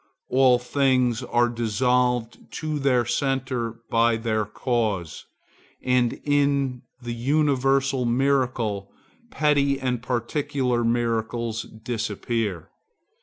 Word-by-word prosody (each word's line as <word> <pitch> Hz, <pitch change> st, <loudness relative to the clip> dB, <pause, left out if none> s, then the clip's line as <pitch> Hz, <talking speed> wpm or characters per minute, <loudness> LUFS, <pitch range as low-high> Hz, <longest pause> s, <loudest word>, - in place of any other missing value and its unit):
All 130 Hz, -1 st, +5 dB
things 125 Hz, -1 st, +1 dB
are 120 Hz, -1 st, +2 dB
dissolved 120 Hz, +1 st, 0 dB
to 155 Hz, -1 st, -3 dB
their 130 Hz, -3 st, +2 dB
centre 130 Hz, -2 st, -1 dB, 0.2 s
by 115 Hz, 0 st, +3 dB
their 110 Hz, -2 st, -1 dB
cause, 105 Hz, -7 st, -2 dB, 0.5 s
and 125 Hz, -2 st, +1 dB
in 140 Hz, -3 st, +1 dB, 0.2 s
the 120 Hz, -1 st, -5 dB
universal 135 Hz, 0 st, +1 dB
miracle 120 Hz, -5 st, 0 dB, 0.4 s
petty 140 Hz, -4 st, +2 dB
and 125 Hz, -2 st, -1 dB
particular 125 Hz, 0 st, -1 dB
miracles 115 Hz, -1 st, -1 dB, 0.2 s
disappear. 115 Hz, -5 st, -3 dB
125 Hz, 90 wpm, -24 LUFS, 115-135 Hz, 0.5 s, All